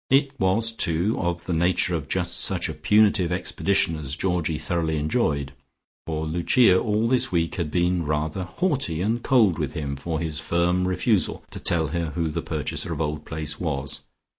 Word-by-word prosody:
It 135 +1 +3
was, 100 +5 +2
too, 90 0 +1
of 85 -1 -2
the 90 - -2
nature 90 +1 +2
of 80 -4 -3
just - - 0
such - - +1
a - - -4
punitive 95 +3 +3
expedition 90 -1 +1
as 75 -2 -4
Georgie 90 -4 -1
thoroughly 80 -2 -1
enjoyed, 75 - 0 0.6
for 80 -1 -2
Lucia 90 +5 +4
all 110 +1 0
this 125 +1 +2
week 85 -2 0
had 85 -4 -2
been 90 +1 +1
rather 75 +4 -2
haughty 130 - -1
and 115 +4 0
cold 110 - +3
with - - -2
him 70 -2 -3
for 80 +3 -3
his 80 -2 -2
firm 90 +2 +1
refusal 90 -2 0
to - - -7
tell 80 -3 +1
her 85 +1 -2
who 85 -2 0
the 75 - -3
purchaser - - -3
of - - -4
Old 75 -1 -3
Place 75 -1 -3
was. 70 -5 -3
85 Hz, 180 wpm, -24 LUFS, 80-95 Hz, 0.6 s, Lucia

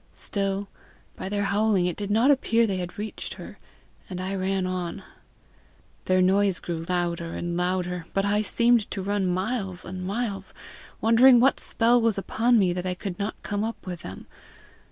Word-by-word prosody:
Still, 195 -1 -2 0.5
by 190 - -5
their 205 0 -1
howling, 200 -2 +2
it 180 -2 -1
did 205 -1 -4
not 230 +7 +4
appear 235 -4 +3
they 195 -4 -1
had 175 -1 -5
reached 210 +1 -5
her, - - -10 0.5
and 180 -2 -5
I 185 +1 -3
ran 190 0 0
on. 180 -2 -3 1.0
Their 185 0 +3
noise 195 0 +3
grew 165 -2 -4
louder 170 -2 -1
and 175 0 -3
louder, 180 -1 -1
but 195 0 0
I 205 +1 +2
seemed 235 +1 +2
to 195 - -4
run 200 -1 0
miles 190 0 -2
and 185 0 -6
miles, 200 +1 -3 0.5
wondering 240 +2 +7
what 265 +3 +4
spell 240 +1 +2
was 225 -3 +2
upon 230 +4 +2
me 185 -4 +3
that 180 0 -4
I 180 - -1
could 180 -1 -6
not 200 +1 -3
come 205 0 -2
up 225 +1 -5
with 175 -3 -6
them. 95 -6 -9
195 Hz, 175 wpm, -26 LUFS, 180-220 Hz, 1.0 s, wondering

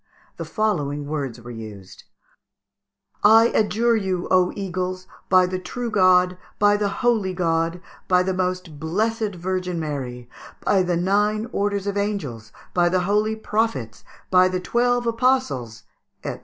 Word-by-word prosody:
The - - -5
following 150 - -1
words 140 -5 -4
were 120 +1 -10
used: 110 -5 -10 1.2
"I 225 +2 +7
adjure 230 +2 +2
you, 190 -4 -1
O 185 -1 +4
eagles! 185 -1 -3 0.2
by 185 0 +6
the 185 0 -3
true 235 +5 -5
God, 185 -2 +4 0.2
by 205 0 +4
the 205 -1 0
holy 215 -6 0
God, 165 -1 0 0.3
by 180 0 +4
the 190 +1 -1
most 180 -4 -3
blessed 210 +6 -1
Virgin 180 0 -3
Mary, 130 -6 -5 0.3
by 195 - +3
the 180 -1 0
nine 210 +4 +1
orders 200 -1 -1
of 200 0 -2
angels, 145 - -3 0.2
by 175 -1 +3
the 185 +1 +1
holy 210 +3 +1
prophets, 215 - -2 0.3
by 185 0 +6
the 185 0 -1
twelve 245 +5 +1
apostles, 230 - 0 0.4
&c.... - - -4
185 Hz, 140 wpm, -23 LUFS, 165-210 Hz, 1.2 s, I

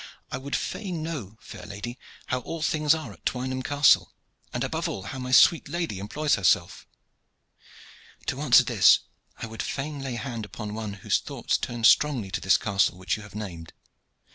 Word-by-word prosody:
I 125 - -3
would 140 +2 -3
fain 180 -7 -3
know, 125 - -6
fair - - -11
lady, 120 +5 -7 0.3
how 130 - -1
all 160 +6 -6
things 155 -1 +3
are 155 -10 -7
at 85 - -20
Twynham 130 +1 -2
Castle, 145 +2 +3 0.4
and - - -2
above - - -2
all 95 - -5
how 130 +7 -6
my 125 0 -5
sweet 160 +6 +6
lady 170 - -3
employs 145 +9 -1
herself." 95 -5 +1 1.4
"To - - -3
answer - - +6
this - - +5 0.4
I - - -5
would 115 0 -6
fain 145 +1 -4
lay 135 -3 -4
hand 120 -2 -5
upon 105 0 -7
one 110 -2 -4
whose - - +3
thoughts - - -2
turn 120 -1 -3
strongly 115 -3 +4
to - - -2
this 95 -5 +4
castle 95 -1 +1
which 95 0 -1
you 110 - -8
have 105 -1 -13
named. 85 -7 -7
120 Hz, 180 wpm, -26 LUFS, 105-145 Hz, 1.4 s, sweet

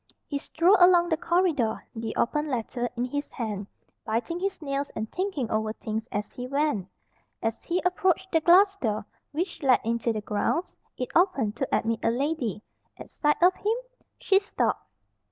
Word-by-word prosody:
He 285 - -3
strolled 345 +7 +3
along 355 -1 +6
the 320 - +3
corridor, 325 -9 +1
the 225 -1 -4
open 300 +5 0
letter 245 -2 -2
in 240 - 0
his 285 +3 -3
hand, 210 -5 -4 0.4
biting 240 +11 -2
his 390 +1 -2
nails 280 -2 -2
and 220 0 -4
thinking 365 - -2
over 215 0 0
things 220 +1 -4
as 205 0 -3
he 250 0 -6
went. 280 -8 0 0.6
As 225 0 -1
he 355 +1 -1
approached 365 +1 +1
the 325 - +3
glass 385 +4 +6
door 215 - -2 0.3
which 340 +5 -3
led 260 -4 +5
into 230 +1 0
the 215 -1 -3
grounds, 210 - -1 0.2
it 250 - -4
opened 285 - +2
to 270 - -1
admit 225 0 +1
a - - +3
lady. 245 - -1 0.3
At - - -11
sight 295 -1 +1
of 365 +1 +7
him 430 +4 0 0.4
she 390 -1 +3
stopped. 405 +2 -1
280 Hz, 170 wpm, -27 LUFS, 225-350 Hz, 0.6 s, of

